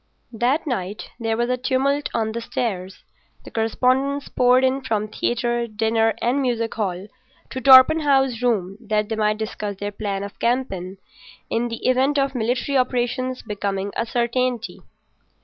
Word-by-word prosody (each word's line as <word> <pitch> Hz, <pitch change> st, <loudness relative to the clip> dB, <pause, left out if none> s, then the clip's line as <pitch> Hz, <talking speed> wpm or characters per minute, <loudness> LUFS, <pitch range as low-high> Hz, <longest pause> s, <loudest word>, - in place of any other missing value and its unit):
That 250 Hz, +7 st, +1 dB
night 210 Hz, -, -4 dB
there 225 Hz, -1 st, -1 dB
was 240 Hz, 0 st, +1 dB
a 250 Hz, -, +1 dB
tumult 275 Hz, +3 st, 0 dB
on 220 Hz, -1 st, -1 dB
the 235 Hz, +1 st, -4 dB
stairs. 195 Hz, -5 st, -4 dB, 0.4 s
The -, -, -12 dB
correspondents 260 Hz, +5 st, 0 dB
poured 250 Hz, +1 st, +4 dB
in 260 Hz, +1 st, +2 dB
from 215 Hz, -5 st, -1 dB
theatre, 240 Hz, +2 st, -1 dB
dinner, 225 Hz, 0 st, +1 dB
and 255 Hz, +4 st, +1 dB
music 235 Hz, -3 st, -1 dB
hall 190 Hz, -3 st, -3 dB, 0.5 s
to 260 Hz, -, -4 dB
Torpenhow's 270 Hz, -1 st, +6 dB
room 205 Hz, -5 st, 0 dB
that 210 Hz, -1 st, 0 dB
they 220 Hz, -, -1 dB
might 215 Hz, 0 st, +1 dB
discuss 210 Hz, -2 st, -4 dB
their 205 Hz, +1 st, -4 dB
plan 200 Hz, -1 st, -3 dB
of 200 Hz, -, -9 dB
campaign 195 Hz, -7 st, -1 dB, 0.5 s
in 235 Hz, +1 st, 0 dB
the 230 Hz, +1 st, -4 dB
event 265 Hz, +3 st, +2 dB
of 275 Hz, -1 st, +1 dB
military 250 Hz, +3 st, 0 dB
operations 255 Hz, +1 st, -1 dB
becoming 200 Hz, -2 st, -3 dB
a 230 Hz, -, -1 dB
certainty. 240 Hz, 0 st, -1 dB
235 Hz, 150 wpm, -22 LUFS, 215-255 Hz, 0.5 s, Torpenhow's